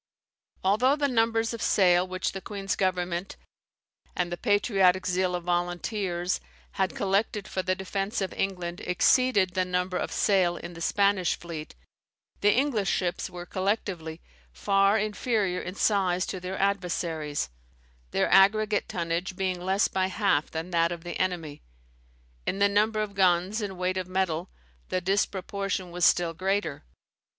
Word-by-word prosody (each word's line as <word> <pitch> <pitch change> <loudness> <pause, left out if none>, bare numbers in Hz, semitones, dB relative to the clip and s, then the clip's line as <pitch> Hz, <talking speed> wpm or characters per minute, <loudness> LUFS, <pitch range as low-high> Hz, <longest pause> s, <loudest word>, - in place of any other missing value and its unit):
Although 230 +9 +3
the 290 -1 +1
numbers 225 -2 +1
of 230 - -6
sail 180 -2 +4
which 185 0 -2
the 195 - -6
queen's 195 -1 -3
government, 180 -1 -1 0.8
and 175 -1 -1
the - - -1
patriotic 195 -3 +2
zeal 180 0 +1
of 175 - -4
volunteers, 175 +1 -1 0.3
had 190 -3 -1
collected 200 +1 0
for 190 - -2
the 185 0 0
defence 195 +3 -3
of 190 -2 -2
England 180 -3 -3
exceeded 200 0 +3
the 185 -1 +1
number 180 0 -1
of - - -3
sail 185 -4 +2
in 175 - -8
the 165 - -10
Spanish 200 0 +2
fleet, 165 -3 -8 0.6
the 205 - +4
English 240 -5 +1
ships 180 -1 -1
were, 175 -1 -8
collectively, 185 -5 -2 0.3
far 195 - +3
inferior 210 -3 0
in 180 - -6
size 190 -4 +2
to 190 - -5
their 185 +1 -5
adversaries; 170 - -1 0.6
their - - +1
aggregate 210 +2 +4
tonnage 170 +2 -2
being 185 -1 -2
less 190 +2 +2
by 185 0 0
half 190 -6 +1
than 165 +3 -5
that 170 0 +2
of 170 -1 -6
the 175 - -5
enemy. 170 -6 -2 0.9
In - - 0
the 200 0 +4
number 215 +2 +2
of 210 -1 -3
guns, 190 +2 +2
and 195 -3 -4
weight 185 +1 -1
of 185 -1 -3
metal, 185 -2 -1 0.4
the 185 - 0
disproportion 195 0 -1
was 175 0 +1
still 170 -1 +3
greater. 185 - -2
185 Hz, 150 wpm, -27 LUFS, 175-200 Hz, 0.9 s, sail